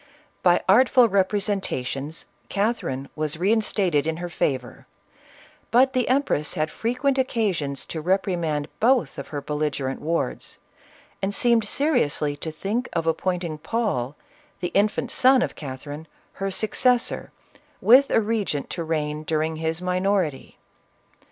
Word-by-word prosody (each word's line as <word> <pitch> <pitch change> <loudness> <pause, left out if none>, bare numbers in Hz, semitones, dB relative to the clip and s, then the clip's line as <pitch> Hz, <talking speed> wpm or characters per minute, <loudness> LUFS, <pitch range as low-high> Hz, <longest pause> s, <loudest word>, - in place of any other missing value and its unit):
By 175 -1 +4
artful 245 +4 +6
representations, 190 - -1 0.2
Catherine 200 - -1
was 155 0 -2
reinstated 190 -5 +1
in 160 0 -1
her 175 0 -5
favor, 130 -7 -2 0.8
but 260 +3 +4
the 255 -3 +1
empress 255 - +1
had 155 0 -1
frequent 255 +4 0
occasion 195 - 0
to 160 +3 -5
reprimand 170 -4 0
both 250 +2 +2
of - - -7
her 145 -2 -5
bellige 150 0 -2
rent 135 0 -3
wards, 165 +2 -2 0.6
and 200 +1 -1
seemed 235 -2 +3
seriously 205 - +1
to 160 - -5
think 205 +11 -3
of 165 -1 -1
appoint 180 +2 0
ing 155 -3 -5
Paul, 150 - -1 0.4
the 175 - -2
infant 205 +3 +1
son* 260 0 +5
of - - -3
Catherine, 145 +2 -8 0.3
her 195 - 0
successor, 235 +5 +1 0.5
with 260 +5 +6
a 225 - +3
regent 205 -10 -2
to 170 - -3
reign 150 -2 -2
during 155 0 -1
his 160 +2 -2
minority. 180 -5 -1
180 Hz, 130 wpm, -24 LUFS, 150-225 Hz, 0.8 s, artful